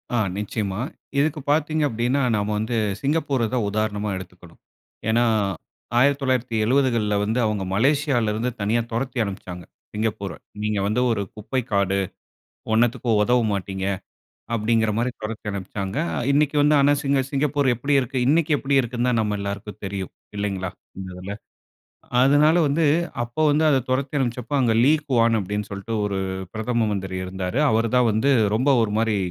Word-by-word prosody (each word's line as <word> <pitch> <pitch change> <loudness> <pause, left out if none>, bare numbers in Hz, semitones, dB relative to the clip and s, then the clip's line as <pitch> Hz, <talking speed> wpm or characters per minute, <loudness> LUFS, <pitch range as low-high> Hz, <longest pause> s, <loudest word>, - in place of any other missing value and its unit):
ஆ. - - +2 0.2
நிச்சயமா. 105 -1 -3 0.4
இதுக்கு 150 +1 +1
பார்த்தீங்க 155 0 +1
அப்டின்னா 120 +5 0
நம்ம 105 0 -1
வந்து 110 +2 -1 0.2
சிங்கப்பூர 140 -5 0
தான் 120 -4 +1
உதாரணமா 105 0 -1
எடுத்துக்கணும். 90 -2 -12 0.5
ஏனா, 115 +2 +3 0.8
1970கள்ல 125 -4 +2
வந்து 110 +4 0
அவங்க 105 -3 -1
மலேசியாவில 135 -1 +2
இருந்து 115 +4 -1
தனியா 110 +4 +1
தொரத்தி 125 +3 -3
அனுப்பிச்சாங்க 90 -3 -7 0.3
சிங்கப்பூர. 105 -2 -2 0.3
"நீங்க 105 -1 0
வந்து 110 +4 +1
ஒரு 105 -3 0
குப்பை 120 +5 -2
காடு, 100 -1 +2 0.8
ஒன்னத்துக்கும் 115 -1 +2
உதவ 125 +3 +3
மாட்டீங்க" 95 -1 -3 0.7
அப்டிங்கிற 110 0 +2
மாரி 120 +2 0
தொரத்தி 110 0 -6
அனுப்பிச்சாங்க. 100 +2 -4 0.3
இன்னைக்கு 145 +1 +2
வந்து 150 +1 +4
ஆனா, 140 +1 +5
சிங்க 140 -2 +2
சிங்கப்பூர் 145 0 +1
எப்டி 140 +5 -1
இருக்கு? 130 +1 -3
இன்னைக்கு 160 +2 +3
எப்டி 140 0 0
இருக்குதுன்னு 120 +1 -1
தான் 115 - +2
நம்ம 105 -1 -1
எல்லாருக்கும் 100 +1 -5
தெரியும் 95 -1 -4 0.3
இல்லைங்களா. 95 -3 -2 0.3
இந்த 95 -1 -6
இதுல. 95 +2 -6 0.9
அதனால 145 +5 +5
வந்து 155 +3 +1 0.4
அப்போ 120 +5 -5
வந்து 150 +2 +2
அத 135 - +4
தொரத்தி 135 +2 0
அனுப்பிச்ச 125 -2 -1
அப்ப, 135 - -5
அங்கு 120 -3 +2
லீ 145 - +6 0.2
குவான் 115 -3 +3
அப்டி 100 +1 -3
என்று 105 - -5
சொல்ட்டு 100 +4 -5
ஒரு 100 -1 -2 0.4
பிரதம 115 +1 0
மந்திரி 95 -2 -3
இருந்தாரு. 95 +5 -3
அவரு 115 +1 +1
தான் 125 -2 +4
வந்து 110 +7 +2 0.2
ரொம்ப 130 +6 +2
ஒரு 105 -2 -1
மாரி 110 -1 +1
115 Hz, 150 wpm, -23 LUFS, 105-135 Hz, 0.9 s, லீ